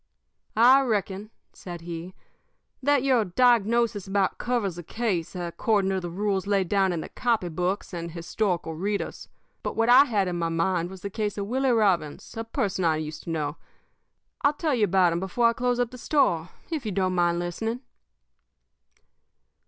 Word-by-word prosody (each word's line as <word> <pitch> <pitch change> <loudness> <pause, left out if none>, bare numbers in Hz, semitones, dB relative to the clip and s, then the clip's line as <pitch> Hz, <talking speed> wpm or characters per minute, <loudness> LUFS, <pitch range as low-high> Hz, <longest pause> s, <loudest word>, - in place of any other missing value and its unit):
"I 255 +4 +7
reckon," 210 -4 -2 0.2
said 175 -2 -8
he, 170 +2 -7 0.7
"that 280 -1 +3
your 255 -4 +3
diagnosis 235 0 +2
about 195 -1 0
covers 235 -8 -1
the - - -5
case 190 -2 -2
according 190 +3 0
to 190 - 0
the 175 -1 -5
rules 195 +1 -1
laid 195 -3 +1
down 195 -2 +2
in 170 -2 -2
the - - -8
copy 230 -7 0
books 180 +4 -2
and 170 -1 -4
historical 170 0 -2
readers. 200 +5 -3 0.3
But - - -4
what 225 +1 +2
I 255 +3 +8
had 205 -7 0
in 175 -1 -2
my 165 -1 0
mind 170 +1 0
was 190 -1 -10
the 200 -1 -5
case 210 0 -2
of 200 - -2
Willie 260 +5 0
Robbins, 195 -8 +1
a 225 - -3
person 200 -4 -2
I 160 -2 +3
used 155 0 -6
to - - -6
know. 150 -2 -2 0.8
I'll 285 - +3
tell 300 0 -1
you 225 -4 +3
about 180 -2 +3
him 170 - -1
before 210 +6 +2
I - - 0
close 245 +1 0
up 245 -1 0
the 250 - -10
store, 180 - +1 0.2
if 310 -5 -2
you 215 - -3
don't 185 -1 0
mind 175 -1 +2
listening. 220 +8 -3
195 Hz, 180 wpm, -26 LUFS, 175-230 Hz, 0.8 s, I